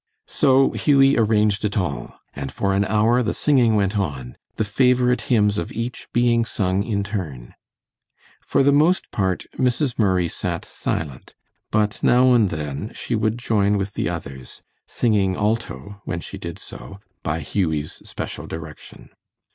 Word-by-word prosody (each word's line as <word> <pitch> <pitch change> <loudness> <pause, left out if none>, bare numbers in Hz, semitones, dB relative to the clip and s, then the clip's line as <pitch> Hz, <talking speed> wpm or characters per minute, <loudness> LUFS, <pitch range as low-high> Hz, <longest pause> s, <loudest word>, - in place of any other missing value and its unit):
So 135 0 +3
Hughie 140 -2 +4
arranged 105 -2 +2
it 105 -1 -1
all, 90 -8 -3 0.2
and 70 -1 -5
for 100 -1 -1
an 100 +1 +2
hour 110 +4 +3
the 115 - -1
singing 125 -7 +3
went 100 0 +1
on, 65 -9 -4 0.2
the 110 - 0
favorite 125 +3 +2
hymns 105 -5 +3
of 85 - -5
each 115 +2 -5
being 120 -1 +3
sung 95 -4 0
in 100 -2 -1
turn. 80 - -5 0.9
For 135 - +2
the 140 - +5
most 155 +6 +2
part, 95 -3 -1
Mrs. 125 0 +1
Murray 95 -5 +2
sat - - -4
silent, 70 -5 -5 0.3
but 105 0 0
now 125 +1 +5
and 110 -5 +4
then 75 - -4
she - - -4
would 110 0 +1
join 105 -4 +1
with 100 0 -3
the - - -1
others, 70 -7 -7 0.2
singing 100 -5 +1
alto 100 - -3
when 85 - -3
she - - -8
did 85 -1 -6
so, 100 - -10 0.2
by 80 +1 -2
Hughie's 80 -2 -2
special - - -6
direction. 80 -1 -10
105 Hz, 155 wpm, -22 LUFS, 90-120 Hz, 0.9 s, the